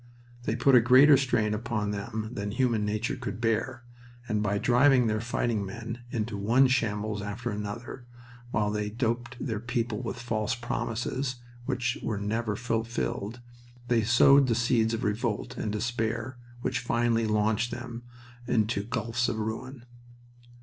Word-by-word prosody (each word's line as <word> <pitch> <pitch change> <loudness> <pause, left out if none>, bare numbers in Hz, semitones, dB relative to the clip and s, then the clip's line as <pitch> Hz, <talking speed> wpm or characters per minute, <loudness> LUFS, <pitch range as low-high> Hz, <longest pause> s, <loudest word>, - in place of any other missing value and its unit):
They 110 - 0
put 130 +3 +3
a 125 - +8
greater 130 +5 +7
strain 120 -6 +1
upon 105 -2 -2
them 110 +2 -4
than 100 -3 -3
human 115 -1 +1
nature 110 +5 -1
could 125 -3 -5
bear, 120 +2 -1 0.4
and 105 -1 0
by 100 -1 0
driving 125 +3 +4
their 110 -1 0
fighting 120 -2 -1
men 115 +4 -6
into 110 -3 -2
one 120 +7 +4
shambles 105 -4 0
after 105 +4 -4
another, 105 +4 -6 0.4
while 105 -2 0
they 105 0 -2
doped 120 +2 -2
their 110 -6 -2
people 115 -1 -2
with - - -4
false 115 -2 -1
promises 120 +2 -2 0.3
which 125 -2 -1
were 110 - -2
never 105 +1 -1
fulfilled, 115 0 -2 0.5
they 120 -2 +4
sowed 130 +5 +6
the 115 - +2
seeds 115 -1 +2
of 115 - -5
revolt 105 0 -1
and 105 - -3
despair 120 +3 -2 0.2
which - - 0
finally 120 -1 +1
launched 105 +2 +1
them 120 -1 -6 0.5
into 110 -4 +1
gulfs 120 +2 -1
of 110 - -2
ruin. 120 +4 -5
115 Hz, 150 wpm, -28 LUFS, 105-120 Hz, 0.5 s, a